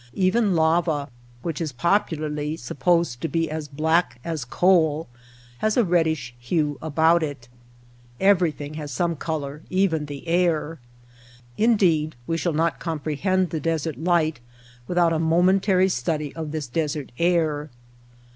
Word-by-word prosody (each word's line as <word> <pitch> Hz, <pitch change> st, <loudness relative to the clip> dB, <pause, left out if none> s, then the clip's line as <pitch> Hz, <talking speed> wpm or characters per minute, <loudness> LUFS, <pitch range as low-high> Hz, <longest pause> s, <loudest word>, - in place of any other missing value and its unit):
Even 195 Hz, +1 st, +2 dB
lava, 160 Hz, -2 st, +1 dB, 0.3 s
which 165 Hz, -1 st, -3 dB
is 155 Hz, -3 st, -2 dB
popularly 155 Hz, 0 st, -1 dB
supposed 155 Hz, +1 st, 0 dB
to -, -, -1 dB
be 165 Hz, -1 st, -1 dB
as 155 Hz, -1 st, -4 dB
black 160 Hz, +1 st, 0 dB
as 160 Hz, -4 st, -3 dB
coal, 160 Hz, +1 st, +2 dB, 0.5 s
has 215 Hz, +2 st, +1 dB
a 245 Hz, -, +5 dB
reddish 160 Hz, -, 0 dB
hue 145 Hz, +3 st, -1 dB
about 160 Hz, +2 st, +3 dB
it. 145 Hz, -6 st, -5 dB, 0.7 s
Everything 170 Hz, -7 st, +2 dB
has 150 Hz, -2 st, -6 dB
some 170 Hz, +6 st, 0 dB
color 150 Hz, -2 st, -4 dB
— -, -, -27 dB, 0.2 s
even 160 Hz, -5 st, -1 dB
the 145 Hz, +2 st, -8 dB
air. 165 Hz, -2 st, +1 dB, 0.8 s
Indeed, 180 Hz, -9 st, +2 dB
we 165 Hz, -, -1 dB
shall 165 Hz, 0 st, -1 dB
not 165 Hz, +2 st, 0 dB
comprehend 165 Hz, +4 st, -1 dB
the 160 Hz, -, -2 dB
desert 160 Hz, 0 st, -2 dB
light 160 Hz, -4 st, +1 dB, 0.5 s
without 175 Hz, -2 st, +2 dB
a 160 Hz, -, 0 dB
mo 165 Hz, +2 st, +3 dB
mentary 190 Hz, 0 st, +3 dB
study 150 Hz, +2 st, -2 dB
of 160 Hz, -2 st, -5 dB
this 155 Hz, -2 st, -3 dB
desert 150 Hz, 0 st, -3 dB
air. 160 Hz, -4 st, +1 dB
160 Hz, 140 wpm, -24 LUFS, 150-175 Hz, 0.8 s, a